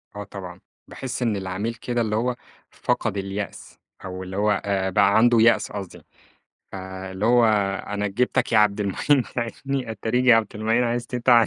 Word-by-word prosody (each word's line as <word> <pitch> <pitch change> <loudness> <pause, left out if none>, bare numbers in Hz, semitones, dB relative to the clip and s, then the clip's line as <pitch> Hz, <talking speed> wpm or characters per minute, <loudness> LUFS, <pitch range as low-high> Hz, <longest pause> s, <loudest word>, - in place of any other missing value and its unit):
آه 105 - -5
طبعًا، 95 -3 -9 0.3
باحس 130 -1 -6
إن 115 -4 +1
العميل 95 +4 -3
كده 120 +1 -2
اللي 110 -2 -1
هو، 120 +2 0 0.4
فقد 100 - -1
اليأس 100 0 -6 0.3
أو 95 0 -6
اللي 95 +1 -6
هو 105 0 +2
آآ، 95 -1 0
بقى 100 +3 +4
عنده 120 +1 +5
يأس 115 +1 +4
قصدي. 100 -3 -7 0.7
آآ، 95 0 -7
اللي 95 +3 -3
هو 120 0 +5 0.4
أنا 105 0 -2
جِبتك 120 +4 0
يا 110 - +6
عبد 105 -1 +3
المعين 125 +7 +2
تعينِّي، 125 +1 -3
اتاريك 115 +3 -1
يا 120 -2 +7
عبد 110 -2 +1
المعين 110 +3 +1
عايز 120 0 -1
تتعان. 120 -2 +4
105 Hz, 175 wpm, -23 LUFS, 100-120 Hz, 0.7 s, يا